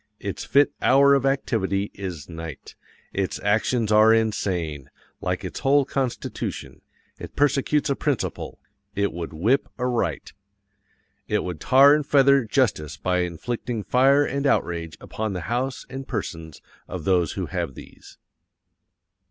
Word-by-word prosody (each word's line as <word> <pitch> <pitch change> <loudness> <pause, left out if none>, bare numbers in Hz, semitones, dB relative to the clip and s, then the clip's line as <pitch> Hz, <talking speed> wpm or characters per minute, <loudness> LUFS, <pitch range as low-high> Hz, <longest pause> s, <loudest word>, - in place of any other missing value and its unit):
Its 100 -1 -5
fit 140 +1 +3
hour 140 +1 +5
of 135 -1 +2
activity 105 -7 -1
is 90 -7 -6
NIGHT. 80 -3 -8 0.4
ITS 95 -1 -2
ACTIONS 110 +2 +1
ARE 110 +1 +6
INSANE, 90 -10 -1 0.3
like 90 +1 -2
its 90 - -6
whole 140 +1 +3
constitution. 130 -2 -4 0.4
It - - -9
persecutes 145 +1 +2
a 140 - +1
principle 145 -4 -3 0.4
IT 100 0 0
WOULD 85 -1 -5
WHIP 105 - +1
A 125 - -2
RIGHT. 115 - -2 0.9
It - - 0
would 90 -4 -5
tar 135 - +6
and 150 0 +2
feather 140 -2 +4
justice 100 - 0
by 90 0 0
inflicting 110 +6 -3
fire 135 +5 +4
and 140 +1 -1
outrage 85 - -1
upon 110 -2 -4
the 90 - -4
house 125 +7 -3
and 135 +1 -7
persons 80 - -6 0.2
of 90 -4 -6
those 90 -2 +2
who - - -3
have 65 - -4
these." - - -14
110 Hz, 140 wpm, -24 LUFS, 90-135 Hz, 0.9 s, ARE